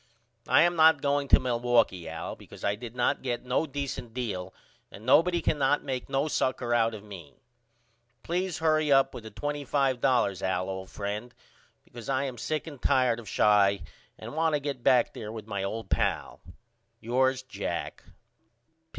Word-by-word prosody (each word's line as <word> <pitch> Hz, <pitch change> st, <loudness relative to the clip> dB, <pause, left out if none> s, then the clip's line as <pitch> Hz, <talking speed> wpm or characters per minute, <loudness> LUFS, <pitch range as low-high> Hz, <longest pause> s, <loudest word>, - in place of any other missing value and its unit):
I -, -, +6 dB
am 175 Hz, 0 st, +2 dB
not 160 Hz, -2 st, +6 dB
going 140 Hz, 0 st, +1 dB
to -, -, +6 dB
Milwaukee 120 Hz, -8 st, +1 dB
Al 80 Hz, 0 st, -5 dB
because -, -, -14 dB
I 100 Hz, -, +1 dB
did 115 Hz, +2 st, -8 dB
not 125 Hz, -, +1 dB
get 125 Hz, -1 st, -3 dB
no 130 Hz, +6 st, 0 dB
decent 135 Hz, -4 st, -5 dB
deal 95 Hz, -7 st, -3 dB, 0.4 s
and 105 Hz, -, -12 dB
nobody 170 Hz, +6 st, +4 dB
cannot 145 Hz, -1 st, +1 dB
make 130 Hz, -1 st, -4 dB
no 135 Hz, +2 st, 0 dB
sucker 125 Hz, -4 st, 0 dB
out 115 Hz, -1 st, +2 dB
of 105 Hz, -, -10 dB
me. 95 Hz, -8 st, -11 dB, 0.9 s
Please 180 Hz, +1 st, -2 dB
hurry 155 Hz, -2 st, +2 dB
up 135 Hz, 0 st, +4 dB
with 110 Hz, -, -9 dB
the -, -, -7 dB
$25 130 Hz, -5 st, 0 dB
Al 95 Hz, 0 st, -1 dB
old 95 Hz, 0 st, -6 dB
friend 105 Hz, +4 st, -5 dB, 0.5 s
because 120 Hz, 0 st, -10 dB
I 135 Hz, 0 st, +1 dB
am 130 Hz, -4 st, -5 dB
sick 155 Hz, -1 st, -2 dB
and 145 Hz, -5 st, -10 dB
tired 125 Hz, -3 st, +2 dB
of 110 Hz, -4 st, -10 dB
Chi 100 Hz, -2 st, +4 dB, 0.4 s
and -, -, -8 dB
want 160 Hz, 0 st, +1 dB
to -, -, 0 dB
get 140 Hz, -3 st, -4 dB
back 125 Hz, +1 st, +3 dB
there 110 Hz, -1 st, -7 dB
with 110 Hz, -2 st, -7 dB
my 100 Hz, -3 st, -4 dB
old 100 Hz, +1 st, -4 dB
pal. -, -, -1 dB, 0.6 s
Yours, 130 Hz, +2 st, +1 dB
JACK. 130 Hz, -, -5 dB
125 Hz, 170 wpm, -28 LUFS, 110-140 Hz, 0.9 s, I